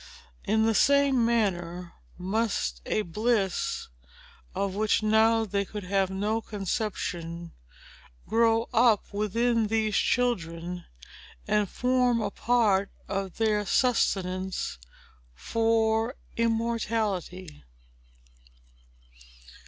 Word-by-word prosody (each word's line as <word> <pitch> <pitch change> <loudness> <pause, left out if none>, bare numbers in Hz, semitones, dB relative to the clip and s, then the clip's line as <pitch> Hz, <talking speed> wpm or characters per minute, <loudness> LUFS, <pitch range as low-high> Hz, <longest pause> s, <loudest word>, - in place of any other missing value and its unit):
In 220 +2 +2
the 225 - +2
same 280 0 +4
manner 180 -6 -1 0.2
must 190 - -1
a 215 - 0
bliss, 210 +1 -1 0.7
of 195 -1 -1
which 215 +2 +1
now 220 +1 +4
they 200 -1 -1
could 205 +1 -7
have 195 0 +1
no 210 +4 -1
conception, 175 -5 -4 0.8
grow 225 0 +2
up 225 -3 +3
within 225 +2 +1
these 215 -1 0
children, 175 -7 -1 0.6
and 210 -2 +1
form 250 -1 +1
a 215 - -2
part 210 -4 +2 0.2
of 195 -2 -4
their 215 -2 +1
sustenance 190 - 0 0.6
for 225 - +1 0.2
immortality. 225 -7 -2
215 Hz, 90 wpm, -27 LUFS, 190-230 Hz, 0.8 s, same